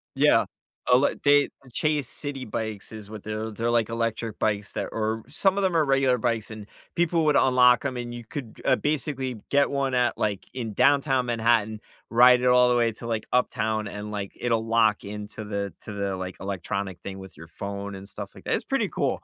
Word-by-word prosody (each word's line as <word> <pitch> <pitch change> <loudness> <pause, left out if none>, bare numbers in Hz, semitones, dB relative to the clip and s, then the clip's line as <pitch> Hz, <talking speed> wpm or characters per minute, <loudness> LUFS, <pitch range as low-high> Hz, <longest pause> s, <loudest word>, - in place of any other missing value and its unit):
Yeah. - - +4 0.4
Oh, 125 - +7
let 140 - 0
they 145 0 +5 0.2
Chase 150 -1 0
Citi 135 -5 -5
bikes, 110 -2 -4
is 105 -2 -9
what 110 -2 -8
they're 110 +1 -4
they're, 115 +3 -2
like, 115 -2 +2
electric 115 -1 -2
bikes 105 -1 -1
that - - -2
or 110 0 -2
some 195 -1 +2
of 200 - +1
them 185 -3 +2
are 155 - +3
regular 135 -2 +3
bikes, 115 -2 -1
and 105 -2 -8 0.3
people 170 -1 +2
would 150 -2 +4
unlock 125 0 +5
'em, 130 -2 -1
and 120 -1 -5
you 120 -1 -8
could, 120 -2 -8
uh, - - +5
basically 135 -4 -2
get 140 0 +3
one 135 -2 -1
at 125 -1 +2
like, 105 -3 -1
in 115 -5 -4
Downtown 135 0 +3
Manhattan, 115 -2 +1 0.3
ride 125 +1 +6
it 125 - +2
all 125 0 +6
the 125 - +3
way 120 -1 +3
to, 115 +1 -8
like, 110 -2 -2
uptown, 110 -4 0
and, 105 +1 -6
like, 100 -2 -4
it'll 115 -2 0
lock 110 -2 +2
into 105 +1 -7
the 100 -2 -3
to 105 - -8
the, 100 -1 -2
like, 95 0 -5
electronic 95 -1 -4
thing 95 +1 -7
with 95 -5 -11
your 80 - -11
phone 100 +3 -6
and 95 +1 -9
stuff - - -8
like - - -13
th - - -1
it's - - -1
pretty - - 0
cool. - - -1
115 Hz, 210 wpm, -26 LUFS, 105-130 Hz, 0.4 s, Oh